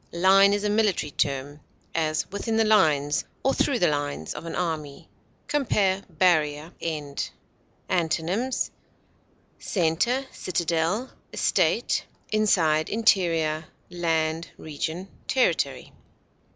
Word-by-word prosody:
Line 190 +3 +6
is 205 0 0
a 210 - +1
military 210 -8 +1
term; 140 +1 -2 0.3
as, 155 -1 0
within 220 +3 -2
the 225 - +4
lines, 150 -9 +3 0.2
or 270 - +3
through 275 - +1
the 180 - +3
lines, 145 - -2
of - - -8
an - - -4
army. 155 -5 -3 0.4
Compare 200 -9 +1
BARRIER; 155 -2 +1
END. 150 -4 -3 0.6
Antonyms: 180 +8 0 0.9
center, 200 +10 0
citadel, 175 +6 -1 0.2
estate, - - +1 0.3
inside, 165 -8 +2
interior, 165 -8 +2 0.3
land, 165 -2 0
region, 160 +4 -4 0.2
territory. 260 -1 0
170 Hz, 100 wpm, -25 LUFS, 155-205 Hz, 0.9 s, Line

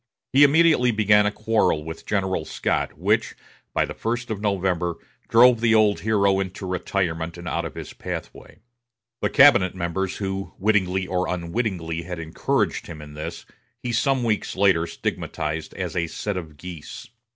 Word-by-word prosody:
He 135 - +5
immediately 150 -3 +5
began 105 -2 +4
a - - 0
quarrel 110 -8 +1
with 80 +1 -8
General 95 -5 0
Scott, - - -2
which, - - +1 0.4
by - - +1
the - - -7
first 120 +1 -3
of 105 -2 -3
November, 90 -4 0 0.3
drove 120 0 +6
the 115 -1 +4
old 105 -2 +4
hero 100 -2 +2
into 95 0 -4
retirement 90 -3 -2
and 85 0 -8
out 85 0 -1
of 85 - -7
his - - -7
pathway. - - -7 0.6
The - - +1
cabinet 100 -11 +6
members 90 +2 -2
who, 95 -1 -4
wittingly 95 -2 +1
or 90 0 -1
unwittingly, 85 -2 -2
had 90 +1 -6
encouraged 80 -1 -1
him 80 - -8
in 75 -1 -10
this 75 +1 -7 0.4
he 125 - -2
some 130 +2 +1
weeks 110 -3 -1
later 95 -4 +3
stigmatized 80 -1 -4
as - - -4
a 85 -1 0
set 105 +4 -4
of 80 -5 -7
geese. 85 -1 -9
95 Hz, 165 wpm, -23 LUFS, 85-110 Hz, 0.6 s, drove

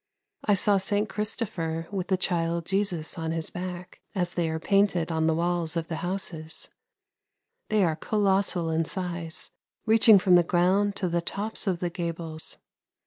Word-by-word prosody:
I 205 - +3
saw 200 +1 +4
St. 205 +2 0
Christopher 180 -7 -2
with 190 -3 -2
the 190 - +2
child 170 -2 0
Jesus 190 -5 -1
on 160 0 -2
his 165 0 -3
back, 180 0 -6
as 180 -2 -1
they 170 -2 0
are 160 - -1
painted 195 -3 +2
on 160 0 +1
the 160 - +3
walls 170 0 0
of 165 -1 -3
the 160 - -2
houses; 175 -3 -4 1.0
they 215 -2 +3
are 165 -3 +2
colossal 195 -3 +1
in 160 +1 +2
size, 170 -1 -5 0.3
reaching 220 -1 +7
from 185 -1 +3
the 175 - +8
ground 185 +4 +2
to 185 - -1
the 170 0 0
tops 205 +5 -4
of 180 -3 0
the 175 -1 -1
gables. 165 -2 -4
175 Hz, 165 wpm, -27 LUFS, 165-195 Hz, 1.0 s, the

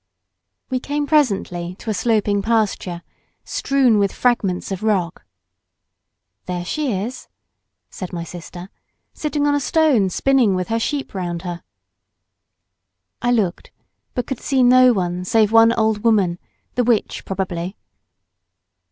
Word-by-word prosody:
We 255 - 0
came 290 +3 -2
presently 195 - 0
to 220 - -5
a - - 0
sloping 205 0 +1
pasture, 200 -5 -1 0.4
strewn 260 -6 +2
with 200 -1 +2
fragments 200 -8 0
of 190 - -3
rock. 190 -6 -1 1.2
"There 180 -1 -3
she 295 +6 -1
is," 215 +6 -4 0.6
said 185 - -7
my 170 -2 -4
sister, 175 +2 -9 0.4
"sitting 295 -1 -1
on 290 - +3
a 290 - +2
stone 285 - +2
spinning 250 -1 +2
with 185 +2 -3
her 225 0 0
sheep 280 +4 -3
round 175 -3 -4
her." 175 -2 -5 1.6
I 240 - 0
looked; 205 -7 0 0.5
but 245 - -1
could 265 - -4
see 265 -2 +2
no 255 +1 +7
one 180 -4 -1
save 215 +3 +2
one 225 0 +6
old 220 -2 0
woman, 200 -7 +2 0.3
the 250 - +1
witch 235 -2 0
probably. 185 -1 -4
215 Hz, 135 wpm, -20 LUFS, 180-250 Hz, 1.6 s, no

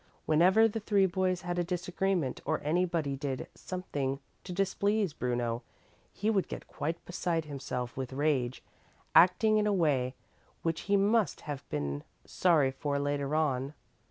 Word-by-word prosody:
Whenever 185 +8 +5
the 225 0 -3
three 205 -2 +3
boys 185 0 0
had 175 0 -2
a - - +2
disagreement 180 -3 -1
or - - 0
anybody 165 -2 0
did 135 -1 -3
something 145 -7 -3 0.3
to 180 - -7
displease 195 0 +1
Bruno, 120 -3 -1 0.5
he 210 - -3
would 205 -4 +2
get - - -7
quite 165 +3 -4
beside 170 -2 -1
himself 130 -4 -4
with 130 -1 -4
rage, 135 -3 0 0.5
acting 215 +5 +6
in 210 - +2
a - - +3
way 135 -8 +1 0.5
which 165 +3 -2
he 200 - +5
must 210 +2 +2
have 145 -2 -6
been 70 -1 -2 0.2
sorry 155 -7 +3
for 140 +1 -2
later 145 0 -1
on. 140 -2 0
160 Hz, 150 wpm, -31 LUFS, 135-185 Hz, 0.5 s, acting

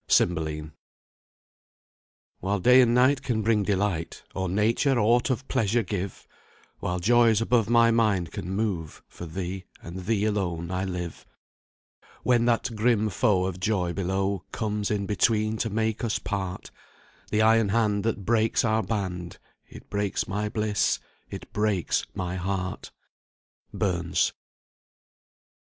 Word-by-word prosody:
CYMBELINE. 80 -2 +1 1.7
"While 100 +2 -1
day 125 +6 +7
and 120 -1 +3
night 130 +3 +4
can 115 -4 -1
bring 110 -1 +3
delight, 95 -4 -1
Or 95 -1 -2
nature 115 +7 +2
aught 120 +3 +3
of 130 +1 -2
pleasure 115 +2 +1
give; 95 -1 -5 0.5
While 90 - -2
joys 115 +2 +4
above 115 -1 +2
my 115 0 +5
mind 105 -7 +1
can 90 - -6
move 95 -6 -3
For 85 - -9
thee, 95 +3 -5
and 90 +2 -8
thee 110 -2 +1
alone 90 -5 -1
I 95 +1 -1
live: 90 -3 -5 1.0
"When 120 -2 +3
that 115 -1 +1
grim 110 -1 +2
foe 95 0 +2
of 95 -1 -4
joy 90 -3 0
below 95 0 -1
Comes 105 -2 -2
in 105 -1 -1
between 110 +1 +1
to 115 - -1
make 110 +1 -1
us 115 -3 0
part, 95 -4 -4 0.6
The 110 +1 +2
iron 110 -1 +4
hand 105 -2 +1
that 105 -3 -2
breaks 115 0 +2
our 110 -1 +2
band, 90 -6 -4 0.3
It - - -13
breaks 100 -2 -1
my 105 +2 -2
bliss 105 -1 +1 0.3
it - - -9
breaks 105 -4 0
my 90 0 -3
heart." 95 0 -3 0.8
BURNS. 85 -3 0
105 Hz, 135 wpm, -26 LUFS, 95-115 Hz, 1.7 s, day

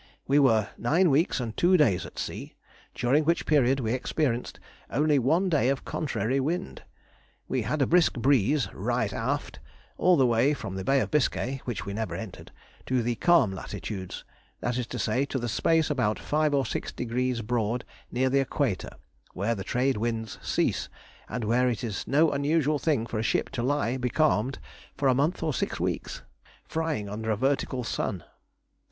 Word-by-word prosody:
We 140 +2 +4
were 110 -7 +3
nine 165 +8 +3
weeks 150 +3 +2
and 115 -3 -4
two 180 +1 +4
days 115 - +2
at - - -15
sea, - - -5 0.4
during 135 +6 +2
which 170 +3 +1
period 135 -3 +3
we 115 -2 -1
experienced 130 -1 -1 0.3
only 150 0 +2
one 160 +10 +2
day 150 -7 +2
of 135 0 -1
contrary 135 -3 -1
wind. 170 +7 -2 0.7
We 130 - 0
had 140 +6 0
a - - +3
brisk 175 +2 +4
breeze 135 +2 +2
"right - - -1
aft" - - -3 0.4
all 180 -1 +5
the 135 - +5
way 125 +5 +3
from 105 -7 -6
the 95 0 -4
Bay 135 +6 +3
of - - -3
Biscay 135 -2 0
(which 120 -5 -4
we 100 - -4
never 110 +1 -3
entered) 110 -5 -8 0.4
to 125 -2 +1
the 120 +1 0
"calm 170 - +4
latitudes," 95 0 -6 0.4
that 120 - -2
is 125 -2 -2
to 125 - -5
say, 110 +4 +1
to 140 - -3
the 120 -2 -2
space 160 +7 +2
about 125 -7 +1
five 150 -1 +1
or 135 -1 +2
six - - -3
degrees 125 0 -2
broad 120 +1 -1 0.3
near 130 +1 +1
the 140 - +4
equator, 135 -7 -1 0.4
where 105 +5 0
the 100 -4 -5
trade 130 +2 0
winds 115 -1 -3
cease, - - 0 0.4
and 125 - -3
where 125 +4 +2
it 115 -3 -3
is 110 -4 -4
no 155 +3 +4
unusual 145 +1 +1
thing 135 -6 +1
for 115 -2 -3
a - - 0
ship 110 - 0
to 125 - -3
lie 130 -1 0
becalmed 130 -1 +1 0.4
for 140 - +1
a 130 - +5
month 150 +7 0
or 155 -2 0
six - - -2
weeks, - - -3 0.4
frying 160 -10 -2
under 110 +2 -4
a 110 - +1
vertical 130 0 0
sun. 100 -5 -3
130 Hz, 185 wpm, -27 LUFS, 115-145 Hz, 0.7 s, all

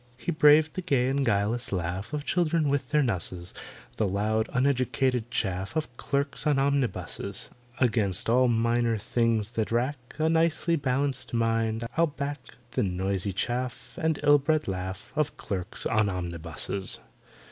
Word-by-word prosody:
He 130 +8 -2
braved 155 0 +6
the 185 - -3
gay 135 -8 +2
and 140 +1 +1
guileless 110 +2 0
laugh 95 +3 -3
Of 150 -1 -3
children 165 -3 +2
with 140 -2 0
their 150 -1 +3
nusses, 90 -5 -3 0.4
The 110 - +2
loud 110 +3 0
uneducated 125 -2 +1
chaff 95 - -2
Of 140 -6 -2
clerks 140 +4 -2
on 145 -2 +3
omnibuses. 135 -7 -1 0.3
Against 110 -7 +1
all 125 +2 +4
minor 115 0 +2
things 115 0 0
that 115 -2 -2
rack 130 +4 0 0.2
A 155 +1 +2
nicely 165 +1 +2
balanced 135 -3 -1
mind, 115 0 +1
I'll 170 0 +5
back 145 -1 -4 0.3
The 130 - 0
noisy 95 0 -1
chaff 120 +5 -3
And 160 -2 +1
ill 145 0 +6
bred 155 +2 +1
laugh 95 +2 -4
Of 150 -1 0
clerks 95 -5 -4
on 110 -2 +2
omnibuses. 90 +1 -3
120 Hz, 145 wpm, -27 LUFS, 105-140 Hz, 0.4 s, braved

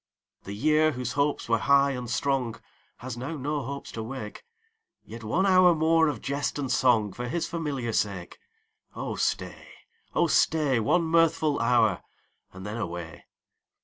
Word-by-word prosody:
The 100 - -6
year, 155 +6 +3
whose 125 -2 -4
hopes 140 +1 0
were 115 -1 +2
high 140 +3 +4
and 125 -3 -5
strong, 130 -2 -1 0.4
Has 125 -1 -7
now 140 +6 -5
no 145 +2 -2
hopes 140 +2 -7
to 115 - -5
wake; 110 -1 -7 0.6
Yet 115 +1 -10
one 170 - +1
hour 185 -2 +5
more 160 +1 +3
of 150 - -3
jest 140 +1 -2
and 135 -3 -3
song 110 -6 +2
For 125 0 -5
his 165 +7 -2
familiar 140 -9 -3
sake. 100 -5 -2 0.6
Oh - - -4
stay, - - -2 0.5
oh 170 - +3
stay, 155 -5 +2
One 170 +11 +2
mirthful 160 -2 +2
hour, 115 -4 +2 0.5
and 95 +1 -10
then 105 +2 -5
away. 85 -6 -6
135 Hz, 155 wpm, -27 LUFS, 115-155 Hz, 0.6 s, hour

